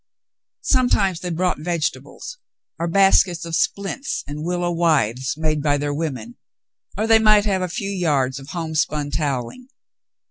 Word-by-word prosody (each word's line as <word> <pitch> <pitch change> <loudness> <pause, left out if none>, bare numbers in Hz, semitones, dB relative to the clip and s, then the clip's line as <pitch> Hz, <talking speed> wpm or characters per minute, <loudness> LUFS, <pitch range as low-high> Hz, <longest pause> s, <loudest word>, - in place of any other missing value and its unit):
Sometimes 210 - +2
they 180 - -5
brought 175 -1 -1
vegetables, 170 - -4 0.4
or 170 - -1
baskets 190 -1 +3
of 165 -1 -3
splints 200 - -2
and 145 +1 -6
willow 175 +1 -1
withes, 135 -8 +1
made 155 -1 -1
by 145 -1 +2
their 145 0 -2
women, 130 -7 -5 0.6
or 215 - 0
they 225 0 +5
might 215 -1 +5
have 195 -3 0
a 185 - -1
few 195 +3 -4
yards 140 -8 0
of 135 - -12
home 165 -2 -5
spun 150 -1 -1
towelling. 140 - -3
165 Hz, 150 wpm, -21 LUFS, 145-195 Hz, 0.6 s, they